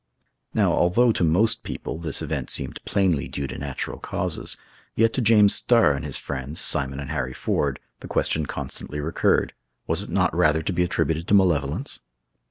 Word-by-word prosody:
Now, - - +3
although 115 +8 +3
to 100 - -1
most 90 +8 +2
people 80 - -6
this 80 -1 -2
event 70 -4 -3
seemed - - -2
plainly 95 -9 +1
due 70 - -4
to - - -6
natural 70 -2 -5
causes, - - -2 0.4
yet 115 0 +3
to 130 - 0
James 105 -3 +5
Starr 115 -11 +4
and 70 +2 -5
his 75 -3 -3
friends, 70 +2 -5
Simon 70 -1 +2
and 70 -1 -6
Harry 65 -4 -2
Ford, 70 -3 -1 0.2
the - - -9
question 80 -2 +1
constantly 75 - -5
recurred, 75 +3 +1 0.3
was - - +1
it - - -8
not - - +1
rather 80 +1 +3
to 95 - -2
be 90 - 0
attributed 85 -1 0
to 105 - +4
malevolence? 85 -8 +1
80 Hz, 180 wpm, -24 LUFS, 70-95 Hz, 0.4 s, James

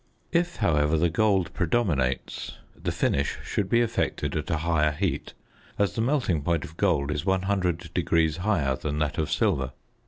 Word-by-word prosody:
If, 175 0 +1
however, 80 -6 +2
the 85 +1 +2
gold 95 -2 +2
predominates 80 - -1 0.2
the - - -3
finish 70 +1 0
should 95 -2 -2
be 120 +2 +4
effected 115 -1 -1
at - - -3
a 80 - +1
higher 75 -2 +1
heat, 95 +4 -2 0.4
as 100 -3 +1
the 115 - -1
melting 120 - +1
point 85 +1 0
of 80 - -12
gold 80 -7 +1
is 75 -1 -2
100° 90 -4 +1
higher 90 -9 +1
than 75 +2 -3
that 75 -1 -1
of 80 -1 0
silver. 75 - +1
85 Hz, 160 wpm, -26 LUFS, 75-100 Hz, 0.4 s, be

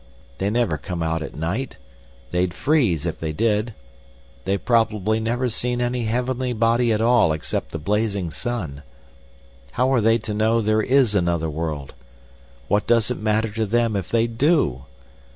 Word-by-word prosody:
They 95 - 0
never 110 -9 0
come 85 +4 -4
out 80 0 -1
at - - -7
night—they'd 75 - -4
freeze 115 - +1
if 85 - -3
they 80 -1 -3
did. 105 +4 0 0.7
They've 100 +1 -1
probably 110 -3 +2
never 120 +3 -1
seen 120 +1 -2
any 120 -1 -1
heavenly 125 +2 -1
body 115 +1 +2
at 110 0 +1
all 120 -7 +4
except 80 - -3
the - - -5
blazing 100 +1 -1
sun. 85 -11 -4 0.9
How 130 +2 +2
are 125 - +3
they 115 +1 +4
to 110 -1 -5
know 110 +2 +2
there 110 0 +2
is 130 -2 +3
another 85 -4 0
world? 75 -3 -4 0.7
What 105 +1 +1
does 115 0 +3
it 125 - -3
matter 110 +1 +1
to 110 +1 -2
them 115 0 +1
if 95 - -3
they 115 0 +2
do? 115 - +1
110 Hz, 160 wpm, -22 LUFS, 85-120 Hz, 0.9 s, all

